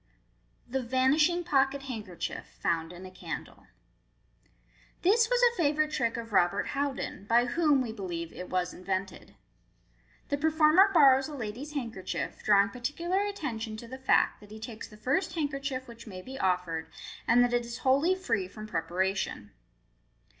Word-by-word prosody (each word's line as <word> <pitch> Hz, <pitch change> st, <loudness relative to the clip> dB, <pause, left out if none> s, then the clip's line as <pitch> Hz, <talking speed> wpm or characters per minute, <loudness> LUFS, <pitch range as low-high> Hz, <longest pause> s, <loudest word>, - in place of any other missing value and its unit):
Thb 260 Hz, +2 st, -2 dB
Vanishing 295 Hz, +8 st, +3 dB
Pocket 275 Hz, -2 st, +1 dB
Handkerchief, 215 Hz, -9 st, -5 dB
found 165 Hz, -1 st, 0 dB
in 180 Hz, +1 st, -10 dB
a 185 Hz, -, -9 dB
Candle. 185 Hz, -, -8 dB, 1.4 s
—This 450 Hz, +5 st, +4 dB
was -, -, +2 dB
a 475 Hz, -1 st, +5 dB
favourite 305 Hz, -3 st, +1 dB
trick 230 Hz, -4 st, 0 dB
of 230 Hz, -2 st, -7 dB
Robert 185 Hz, +1 st, +2 dB
Houdin, 275 Hz, -7 st, -3 dB
by 235 Hz, +2 st, +4 dB
whom, 290 Hz, +2 st, +3 dB
we 235 Hz, -, -4 dB
believe, 175 Hz, -6 st, -5 dB
it 180 Hz, -, -8 dB
was 180 Hz, -1 st, -1 dB
invented. 190 Hz, +1 st, -4 dB, 0.9 s
The 285 Hz, -, 0 dB
performer 315 Hz, +5 st, +5 dB
borrows 270 Hz, -6 st, +6 dB
a 300 Hz, -, -7 dB
lady's 250 Hz, +5 st, -6 dB
handker 230 Hz, -8 st, -4 dB
chief, -, -, -4 dB
drawing 200 Hz, -1 st, +5 dB
particular 295 Hz, -, -2 dB
attention 260 Hz, -, -3 dB
to 235 Hz, -, -9 dB
the 260 Hz, +3 st, -8 dB
fact 260 Hz, -, +3 dB
that 210 Hz, -, -15 dB
he 215 Hz, +1 st, -10 dB
takes 220 Hz, 0 st, -7 dB
the 210 Hz, -, -15 dB
first 285 Hz, -, 0 dB
handkerchief 275 Hz, -4 st, -2 dB
which 235 Hz, 0 st, -12 dB
may 185 Hz, -3 st, -8 dB
be 265 Hz, +4 st, -8 dB
offered, 180 Hz, -5 st, -1 dB, 0.4 s
and 245 Hz, +1 st, +6 dB
that 245 Hz, 0 st, +1 dB
it 240 Hz, 0 st, +2 dB
is 235 Hz, 0 st, -6 dB
wholly 280 Hz, +8 st, +4 dB
free 225 Hz, -, -1 dB
from 215 Hz, +3 st, -9 dB
preparation. 185 Hz, -, -2 dB
245 Hz, 160 wpm, -29 LUFS, 200-290 Hz, 1.4 s, borrows